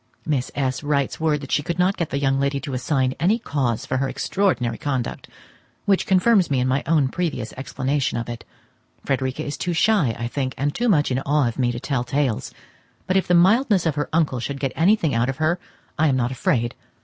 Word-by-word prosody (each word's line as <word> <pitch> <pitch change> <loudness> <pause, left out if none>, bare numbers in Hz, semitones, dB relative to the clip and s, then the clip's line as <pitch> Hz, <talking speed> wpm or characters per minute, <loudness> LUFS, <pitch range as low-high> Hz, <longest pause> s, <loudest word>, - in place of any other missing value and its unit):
Miss 140 -5 -1
S. 130 -2 -1
writes 145 -2 -1
word 155 -2 +1
that 140 - -8
she - - +2
could 170 +3 -3
not 185 +2 +2
get 170 - -2
the 140 - -2
young 135 -1 +1
lady 140 0 0
to 140 0 -5
assign 130 0 0
any 190 +8 +3
cause 135 - -2
for 130 - -1
her 135 +1 0
extraordinary 135 - 0
conduct, 130 -4 -3 0.6
which 195 -2 +2
confirms 190 0 +4
me 135 -3 +1
in 125 - +1
my 130 +2 +1
own 150 -4 +3
previous 135 -8 -3
explanation 135 0 -2
of 115 - -3
it. 120 -1 -6 0.6
Frederica 130 -1 -1
is 145 - -4
too 175 - -2
shy, 165 - +2
I 120 0 -3
think, 130 +1 -3
and 145 +1 0
too 240 0 0
much 150 -8 +3
in 130 - +1
awe 145 -1 +1
of 120 - -4
me 120 -2 +2
to 120 - -5
tell 135 -1 -1
tales, 130 -2 -1 0.5
but 185 - 0
if 190 - +2
the 180 - +4
mildness 195 +2 +4
of 160 - +2
her 145 0 -2
uncle 155 -6 +1
should 140 +3 -4
get 135 -2 -2
anything 170 -3 +3
out 115 +2 +1
of 135 - -3
her, 160 +3 +1 0.4
I 160 - +4
am 135 - +2
not 125 -1 0
afraid. 120 -2 0
140 Hz, 220 wpm, -22 LUFS, 130-165 Hz, 0.6 s, confirms